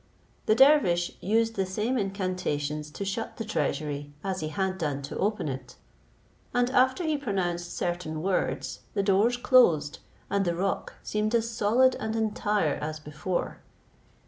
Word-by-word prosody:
The 215 - +5
dervish 230 - +5
used 225 +3 +2
the 195 - 0
same 215 +7 -1
incantations 185 - -2
to 200 +6 -5
shut 200 +4 -4
the 225 - -4
treasury 145 -8 -2
as 190 -1 -2
he 155 - -3
had 190 +3 -2
done 145 -4 -2
to 140 - -6
open 205 -3 0
it; 130 -2 -6 0.8
and 245 0 +2
after 260 +6 +3
he 310 -3 0
pronounced 175 -8 -2
certain 175 -3 -2
words, 190 -1 -1 0.2
the 200 - +1
doors 205 +5 +3
closed, 175 - +4 0.3
and 200 0 +1
the 175 -2 0
rock 195 +3 -2
seemed 215 +2 0
as 230 0 +1
solid 240 +4 +3
and 220 +1 -3
entire 210 -6 0
as 155 +1 -4
before. 150 +4 -3
195 Hz, 150 wpm, -28 LUFS, 160-225 Hz, 0.8 s, The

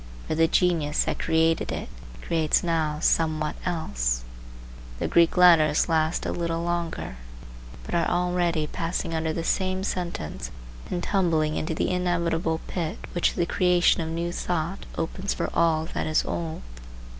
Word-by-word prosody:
For - - -1
the 165 +1 +4
genius 165 -4 +2
that - - -3
created 160 0 +2
it - - -4 0.4
creates 160 -2 +2
now 160 -3 0
somewhat 155 -2 +1
else. - - -1 0.7
The - - -1
Greek 170 +1 +3
letters 165 -4 +6
last 160 0 +1
a - - -1
little 170 -1 -2
longer, 170 - -3 0.7
but - - -8
are 170 -1 +2
already 175 -2 +1
passing 165 +2 -3
under 160 0 0
the 165 +1 -3
same 185 +2 0
sentence 175 - -4 0.4
and 175 - -2
tumbling 160 -6 +1
into 160 0 -2
the - - 0
inevitable 170 -2 0
pit 175 +2 -3 0.2
which 175 - +1
the 175 - +1
creation 180 0 +3
of 160 - -3
new 170 +1 -2
thought 175 +1 -3
opens 185 +4 -2
for - - -2
all 160 -1 +2
that - - -2
is 155 0 +2
old. 165 -2 -4
165 Hz, 150 wpm, -26 LUFS, 160-175 Hz, 0.7 s, letters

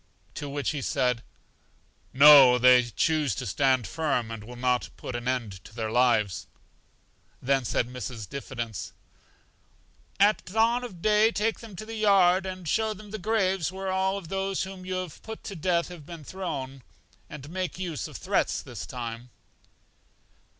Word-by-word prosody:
To 145 - -6
which 140 -2 -2
he 150 - -4
said: 125 -2 0 0.9
No; 135 -2 +9
they 125 0 +6
choose 150 - 0
to - - -4
stand 130 +3 +2
firm, 140 -8 -1
and 115 -2 -7
will 120 +3 -10
not 125 0 0
put 125 - -6
an 120 0 -4
end 115 -7 -2
to 110 - -14
their 110 -2 -3
lives. 115 -5 +2 0.9
Then 135 0 +1
said 120 - 0
Mrs. 125 -3 -6
Diffidence: 115 -9 -6 1.3
At 205 +2 +4
dawn 225 +5 +2
of 190 -9 -9
day 215 +1 +5
take 220 0 -1
them 220 -4 -11
to 215 - -7
the 225 - -8
yard, 195 -3 +4
and 185 -2 -6
show 220 +5 0
them 210 +1 -12
the 215 - -5
graves 190 -4 0
where 190 0 -4
all 190 +1 0
those 195 +2 -2
whom 190 -1 -8
you 185 - -2
have 185 -4 -5
put 220 0 -9
to 200 - -6
death 170 +1 0
have 175 -4 -10
been 165 0 -10
thrown, 140 -7 -5 0.5
and 145 +1 -9
make 185 -1 -3
use 175 -5 -4
of - - -9
threats - - 0
this - - -8
time. 120 0 -6
155 Hz, 165 wpm, -27 LUFS, 125-190 Hz, 1.3 s, No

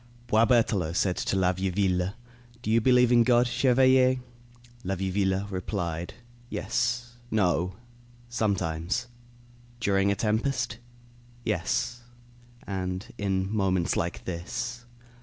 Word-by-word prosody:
Boisberthelot 110 -7 +3
said 90 -1 +2
to - - -1
La 95 -1 +3
Vieuville: 95 0 0 0.5
"Do 110 - -1
you 115 +1 +4
believe 125 0 +5
in 120 -1 +6
God, 120 0 +4
chevalier?" 130 +1 +4 0.7
La 95 -1 -1
Vieuville 95 +1 0
replied: 90 -3 -3 0.3
"Yes 120 +2 -2
no. 90 -4 +1 0.5
Sometimes." 100 -2 -1 0.7
"During 100 -2 +2
a - - +1
tempest?" 115 +2 -1 0.7
"Yes, 110 +4 -1 0.6
and 95 0 -4
in 95 0 -1
moments 95 -4 +1
like 85 +1 -2
this." 115 +7 -4
100 Hz, 100 wpm, -27 LUFS, 95-120 Hz, 0.7 s, in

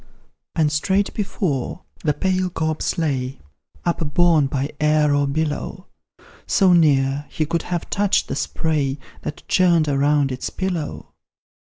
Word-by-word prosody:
And 155 -2 +2
straight 190 +7 +1
before, 185 - -2 0.2
the 150 -3 +1
pale 185 -1 0
corpse 160 -2 -2
lay, 135 -5 -1 0.5
Upborne 165 -2 +3
by 135 +1 -2
air 150 -1 +3
or 145 0 +2
billow, 155 +5 -2 0.6
So 190 -5 +4
near, 145 -3 +3
he 155 - -1
could 165 +2 -1
have 175 -1 -2
touched 205 -1 +1
the - - -3
spray 145 -4 -1 0.2
That 150 - -7
churned 170 -4 +3
around 145 0 +2
its 130 - -3
pillow. 180 -5 -4
155 Hz, 130 wpm, -21 LUFS, 145-175 Hz, 0.6 s, So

